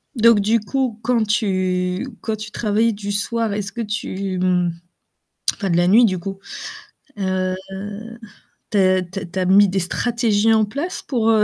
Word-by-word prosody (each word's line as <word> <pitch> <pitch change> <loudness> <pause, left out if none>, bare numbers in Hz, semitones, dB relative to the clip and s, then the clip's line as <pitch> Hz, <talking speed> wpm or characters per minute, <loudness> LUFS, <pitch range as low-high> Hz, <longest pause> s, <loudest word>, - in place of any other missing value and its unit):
Donc 230 -2 +5
du 220 +3 +2
coup, 250 +1 -1
quand 235 -1 +2
tu 185 -1 0
quand 220 -1 -2
tu 215 0 -7
travailles 220 +1 +1
du 205 0 -5
soir, 225 +2 -1
est-ce 200 -1 -4
que 235 - -4
tu 195 -3 -3 1.1
enfin 195 - -3
de 170 - +2
la 175 0 +3
nuit, 220 +6 +6
du 185 -4 0
coup, 195 +2 -6 0.8
heu 185 -1 0 1.1
t'es 185 -2 +3
t'as 190 +2 -6
t'as 185 +1 -2
mis 200 +2 +6
des 195 +1 0
stratégies 225 +3 +1
en 220 -1 +4
place 280 - -4
pour, 230 -4 0
heu, 220 -2 +5
205 Hz, 155 wpm, -21 LUFS, 190-225 Hz, 1.1 s, nuit